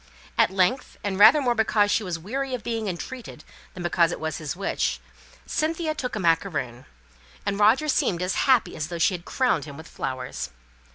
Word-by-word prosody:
At -, -, +4 dB
length, 195 Hz, +8 st, 0 dB
and 195 Hz, -1 st, -2 dB
rather 215 Hz, +9 st, +8 dB
more 245 Hz, -2 st, +3 dB
because 215 Hz, -2 st, +2 dB
she -, -, +2 dB
was 180 Hz, -4 st, -3 dB
weary 260 Hz, +10 st, -3 dB
of 240 Hz, -, -8 dB
being 225 Hz, -2 st, -2 dB
entreated, 190 Hz, -1 st, -6 dB, 0.3 s
than 180 Hz, -, -6 dB
because 175 Hz, -1 st, +2 dB
it -, -, -5 dB
was 160 Hz, 0 st, -3 dB
his 155 Hz, 0 st, -4 dB
wish, 195 Hz, -, -1 dB, 0.5 s
Cynthia 320 Hz, 0 st, -1 dB
took 250 Hz, -6 st, -4 dB
a -, -, -2 dB
macaroon, 160 Hz, -8 st, 0 dB, 0.6 s
and 200 Hz, 0 st, -1 dB
Roger 230 Hz, +9 st, +4 dB
seemed 180 Hz, -, +1 dB
as 180 Hz, 0 st, 0 dB, 0.2 s
happy 255 Hz, -3 st, +4 dB
as 155 Hz, -1 st, -3 dB
though 170 Hz, -, -5 dB
she 170 Hz, -, +3 dB
had 175 Hz, -1 st, -6 dB
crowned 250 Hz, -, +1 dB
him 145 Hz, -2 st, -9 dB
with 160 Hz, +1 st, -10 dB
flowers. 130 Hz, -1 st, -5 dB
195 Hz, 190 wpm, -25 LUFS, 165-245 Hz, 0.6 s, rather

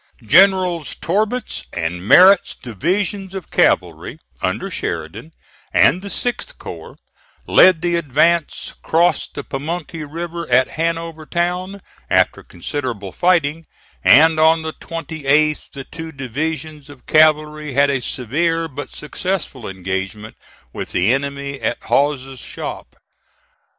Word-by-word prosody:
Generals 180 Hz, -, +4 dB
Torbert's 215 Hz, +7 st, -2 dB
and 85 Hz, +1 st, -3 dB
Merritt's 185 Hz, -, +6 dB
divisions 190 Hz, -, -2 dB
of 190 Hz, -, -7 dB
cavalry, -, -, +1 dB, 0.2 s
under -, -, -2 dB
Sheridan, 85 Hz, -, -5 dB, 0.4 s
and 180 Hz, -, +4 dB
the 200 Hz, -, -8 dB
6th 245 Hz, -, -3 dB
corps, -, -, -10 dB, 0.5 s
led 180 Hz, -3 st, +5 dB
the 175 Hz, -1 st, +1 dB
advance, 165 Hz, +2 st, +1 dB
crossed 170 Hz, +2 st, +1 dB
the 145 Hz, -, -5 dB
Pamunkey 155 Hz, +3 st, -5 dB
River 170 Hz, +3 st, -6 dB
at 130 Hz, +1 st, +4 dB
Hanover 165 Hz, -1 st, -3 dB
Town, 180 Hz, +3 st, -2 dB, 0.3 s
after -, -, +2 dB
considerable 105 Hz, -, -5 dB
fighting, 165 Hz, -, +1 dB, 0.4 s
and 155 Hz, +6 st, +6 dB
on 160 Hz, +1 st, +4 dB
the 160 Hz, 0 st, -4 dB
28th 155 Hz, -2 st, -1 dB
the 135 Hz, -, -8 dB
two 160 Hz, +3 st, -8 dB
divisions 150 Hz, +2 st, -5 dB
of 140 Hz, -3 st, -15 dB
cavalry 155 Hz, -1 st, +3 dB
had 140 Hz, +1 st, +3 dB
a 135 Hz, -2 st, -1 dB
severe, 165 Hz, +8 st, -1 dB
but 145 Hz, -1 st, -7 dB
successful 150 Hz, -, -4 dB
engagement 95 Hz, +3 st, -5 dB, 0.4 s
with -, -, -6 dB
the 95 Hz, +7 st, +3 dB
enemy 140 Hz, 0 st, -3 dB
at -, -, -1 dB
Hawes's 135 Hz, -2 st, 0 dB
Shop. -, -, -7 dB
155 Hz, 120 wpm, -19 LUFS, 135-170 Hz, 0.5 s, Merritt's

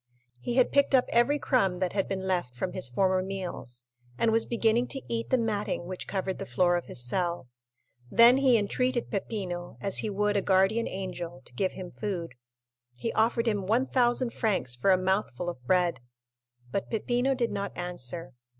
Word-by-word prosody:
He 240 Hz, -, -3 dB
had 255 Hz, -1 st, +4 dB
picked 280 Hz, -1 st, +4 dB
up 255 Hz, -, +4 dB
every 240 Hz, +5 st, +3 dB
crumb 195 Hz, -11 st, +1 dB
that 180 Hz, -1 st, -1 dB
had 195 Hz, -1 st, 0 dB
been 190 Hz, -1 st, -3 dB
left 175 Hz, -10 st, -1 dB
from 180 Hz, +9 st, -3 dB
his 185 Hz, -9 st, -1 dB
former 185 Hz, +8 st, +2 dB
meals, 180 Hz, -11 st, -5 dB, 0.3 s
and 225 Hz, -, +2 dB
was 225 Hz, 0 st, +2 dB
beginning 235 Hz, +1 st, +2 dB
to 270 Hz, -, -3 dB
eat 230 Hz, 0 st, -3 dB
the 260 Hz, -, +3 dB
matting 210 Hz, -6 st, -1 dB
which 185 Hz, +1 st, -6 dB
covered 190 Hz, -1 st, -3 dB
the -, -, -4 dB
floor 175 Hz, +8 st, +2 dB
of 175 Hz, -, -2 dB
his 120 Hz, -, 0 dB
cell. 170 Hz, -4 st, -1 dB, 0.6 s
Then 235 Hz, -, +7 dB
he 265 Hz, -3 st, +5 dB
entreated 245 Hz, +4 st, -1 dB
Peppino, 185 Hz, -4 st, -4 dB
as 195 Hz, -, 0 dB
he 215 Hz, -, -2 dB
would 205 Hz, +1 st, 0 dB
a 200 Hz, -, +3 dB
guardian 195 Hz, +5 st, +2 dB
angel, 175 Hz, -6 st, -6 dB
to -, -, -13 dB
give 185 Hz, +9 st, -1 dB
him 185 Hz, -2 st, -8 dB
food; 180 Hz, -, -4 dB, 0.6 s
he 230 Hz, -, -3 dB
offered 230 Hz, +1 st, +2 dB
him 205 Hz, -4 st, 0 dB
1,000 245 Hz, +1 st, +2 dB
francs 185 Hz, -, +1 dB
for 125 Hz, +10 st, 0 dB
a 185 Hz, -, +6 dB
mouthful 185 Hz, -4 st, -1 dB
of 130 Hz, -8 st, -8 dB
bread. 175 Hz, -6 st, +2 dB, 0.7 s
But 200 Hz, -, -2 dB
Peppino 245 Hz, +4 st, 0 dB
did 240 Hz, -2 st, 0 dB
not 200 Hz, 0 st, -3 dB
answer. 170 Hz, -5 st, -4 dB
195 Hz, 185 wpm, -28 LUFS, 175-230 Hz, 0.7 s, Then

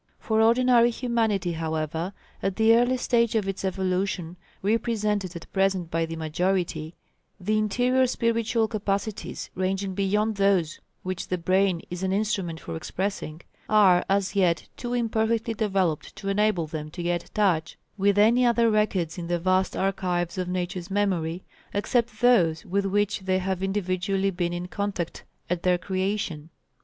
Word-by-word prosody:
For 220 Hz, -1 st, +1 dB
ordinary 240 Hz, +1 st, +5 dB
humanity, 225 Hz, -7 st, 0 dB
however, 160 Hz, +2 st, -3 dB, 0.3 s
at 195 Hz, -1 st, -1 dB
the 225 Hz, +1 st, +5 dB
early 245 Hz, +2 st, +3 dB
stage 235 Hz, -2 st, +1 dB
of 210 Hz, -3 st, +1 dB
its 195 Hz, 0 st, -3 dB
evolution 185 Hz, -2 st, -1 dB, 0.3 s
represented 210 Hz, -3 st, 0 dB
at 170 Hz, -, -10 dB
present 190 Hz, -3 st, +1 dB
by 165 Hz, 0 st, 0 dB
the 165 Hz, -, -5 dB
majority, 165 Hz, 0 st, -1 dB, 0.4 s
the 215 Hz, +3 st, +1 dB
interior 250 Hz, +5 st, +2 dB
spiritual 230 Hz, -2 st, +1 dB
capacities 210 Hz, -1 st, -3 dB
ranging 190 Hz, +1 st, -1 dB
beyond 205 Hz, +2 st, 0 dB
those 195 Hz, -6 st, +2 dB, 0.2 s
which 185 Hz, -2 st, -4 dB
the 185 Hz, -, -1 dB
brain 185 Hz, 0 st, +1 dB
is 175 Hz, 0 st, -4 dB
an 190 Hz, 0 st, 0 dB
instrument 195 Hz, -5 st, -1 dB
for 85 Hz, -, -6 dB
expressing, 175 Hz, -, -4 dB, 0.3 s
are 190 Hz, -4 st, +5 dB
as 195 Hz, 0 st, +1 dB
yet 175 Hz, -4 st, +2 dB
too 245 Hz, 0 st, -4 dB
imperfectly 230 Hz, -1 st, 0 dB
developed 195 Hz, -7 st, -1 dB
to 195 Hz, -, -5 dB
enable 195 Hz, -4 st, +2 dB
them 155 Hz, -1 st, -6 dB
to 175 Hz, +2 st, -6 dB
get 175 Hz, 0 st, -1 dB
touch 180 Hz, -7 st, +1 dB, 0.2 s
with 200 Hz, 0 st, +2 dB
any 230 Hz, +4 st, +5 dB
other 235 Hz, -1 st, +4 dB
records 190 Hz, -6 st, 0 dB
in 170 Hz, -, -5 dB
the 175 Hz, 0 st, +1 dB
vast 185 Hz, +2 st, +1 dB
archives 180 Hz, -3 st, -1 dB
of 185 Hz, -1 st, -2 dB
Nature's 180 Hz, 0 st, -3 dB
memory, 185 Hz, -4 st, 0 dB, 0.3 s
except 225 Hz, +2 st, 0 dB
those 175 Hz, -10 st, +4 dB
with 195 Hz, +2 st, 0 dB
which 205 Hz, +1 st, +1 dB
they 190 Hz, -1 st, 0 dB
have 190 Hz, 0 st, -2 dB
individually 195 Hz, 0 st, 0 dB
been 175 Hz, -1 st, -1 dB
in 175 Hz, +1 st, -4 dB
contact 200 Hz, -3 st, -4 dB, 0.2 s
at 180 Hz, -1 st, -1 dB
their 180 Hz, 0 st, +3 dB
creation. 185 Hz, -4 st, -2 dB
195 Hz, 150 wpm, -26 LUFS, 175-215 Hz, 0.4 s, ordinary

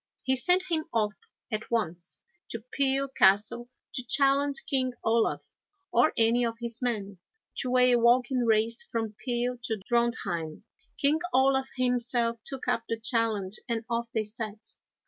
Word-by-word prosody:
He 265 Hz, -, +2 dB
sent 360 Hz, +7 st, +3 dB
him 315 Hz, -2 st, -1 dB
off 210 Hz, -2 st, +1 dB, 0.4 s
at 215 Hz, 0 st, -3 dB
once 180 Hz, -7 st, -3 dB, 0.3 s
to 225 Hz, -1 st, -6 dB
Peel 275 Hz, 0 st, +1 dB
Castle 235 Hz, 0 st, +2 dB, 0.2 s
to 255 Hz, -, -2 dB
challenge 275 Hz, +2 st, +3 dB
King 255 Hz, -2 st, 0 dB
Olaf, 225 Hz, 0 st, +1 dB, 0.5 s
or 310 Hz, -, +4 dB
any 230 Hz, +2 st, +3 dB
of 230 Hz, -1 st, -2 dB
his 235 Hz, 0 st, -5 dB
men, 205 Hz, -6 st, -3 dB, 0.4 s
to 255 Hz, -1 st, 0 dB
a 250 Hz, 0 st, +5 dB
walking 245 Hz, +2 st, +3 dB
race 225 Hz, 0 st, +2 dB
from 225 Hz, -2 st, -4 dB
Peel 245 Hz, 0 st, -1 dB
to 220 Hz, -3 st, -2 dB
Drontheim. 220 Hz, -10 st, -1 dB, 0.3 s
King 295 Hz, +2 st, +2 dB, 0.2 s
Olaf 265 Hz, 0 st, +3 dB
himself 245 Hz, -2 st, 0 dB
took 270 Hz, -2 st, -5 dB
up -, -, +1 dB
the 230 Hz, -, -2 dB
challenge, 220 Hz, -4 st, 0 dB
and 230 Hz, -1 st, -2 dB
off 235 Hz, 0 st, -1 dB
they 220 Hz, -, 0 dB
set. 215 Hz, 0 st, -6 dB
235 Hz, 145 wpm, -28 LUFS, 225-255 Hz, 0.5 s, a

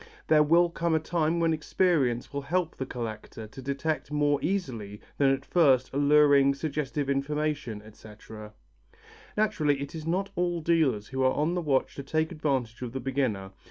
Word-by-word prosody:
There 155 Hz, -1 st, +5 dB
will 170 Hz, +3 st, +4 dB
come 170 Hz, -1 st, 0 dB
a -, -, +3 dB
time 165 Hz, +1 st, 0 dB
when 165 Hz, -1 st, +2 dB
experience 150 Hz, -7 st, 0 dB
will 140 Hz, -, -2 dB
help 170 Hz, +4 st, -1 dB
the 130 Hz, -, -5 dB
collector 110 Hz, -2 st, -6 dB
to 110 Hz, +5 st, -11 dB
detect 140 Hz, +4 st, -3 dB
more 145 Hz, -1 st, +2 dB
easily 120 Hz, -, -3 dB, 0.2 s
than 140 Hz, -1 st, +4 dB
at 135 Hz, 0 st, 0 dB
first 135 Hz, -7 st, +3 dB
alluring, 145 Hz, -1 st, +5 dB
suggestive 145 Hz, -1 st, -3 dB
information, 140 Hz, -5 st, -2 dB
etc. 105 Hz, 0 st, -12 dB, 0.8 s
Naturally 155 Hz, -10 st, +1 dB
it 140 Hz, +4 st, -6 dB
is 160 Hz, -1 st, -7 dB
not 190 Hz, +4 st, -1 dB
all 175 Hz, -1 st, 0 dB
dealers 155 Hz, -11 st, +1 dB
who 130 Hz, 0 st, -3 dB
are 130 Hz, 0 st, +3 dB
on 155 Hz, +4 st, 0 dB
the 180 Hz, -, -1 dB
watch 140 Hz, -5 st, 0 dB
to -, -, -4 dB
take 160 Hz, +4 st, -1 dB
advantage 135 Hz, -8 st, -2 dB
of 125 Hz, -2 st, -5 dB
the 135 Hz, -, -3 dB
beginner. 120 Hz, -7 st, -2 dB
145 Hz, 170 wpm, -28 LUFS, 130-160 Hz, 0.8 s, There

